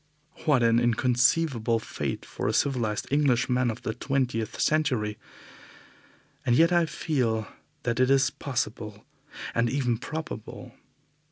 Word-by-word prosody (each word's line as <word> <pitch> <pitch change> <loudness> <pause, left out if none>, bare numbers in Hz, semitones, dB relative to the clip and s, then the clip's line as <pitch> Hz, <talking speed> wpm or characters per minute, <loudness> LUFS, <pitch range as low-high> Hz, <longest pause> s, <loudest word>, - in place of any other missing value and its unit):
What 140 -6 +4
an 115 0 +4
inconceivable 120 +1 +2
fate 110 - -4
for - - -4
a - - +1
civilized 120 -6 0
Englishman 125 -3 +2
of 115 +1 -5
the 110 - -2
twentieth 125 -4 -2
century! 125 -9 +1 1.2
And 120 - +2
yet 165 +6 +5
I 170 -1 +3
feel 120 -8 -1 0.4
that 120 -1 -1
it 130 0 +4
is 135 0 +4
possible 110 -6 -4 0.5
and 115 0 +1
even 125 -3 0
probable. 155 -7 -7
125 Hz, 120 wpm, -27 LUFS, 115-140 Hz, 1.2 s, yet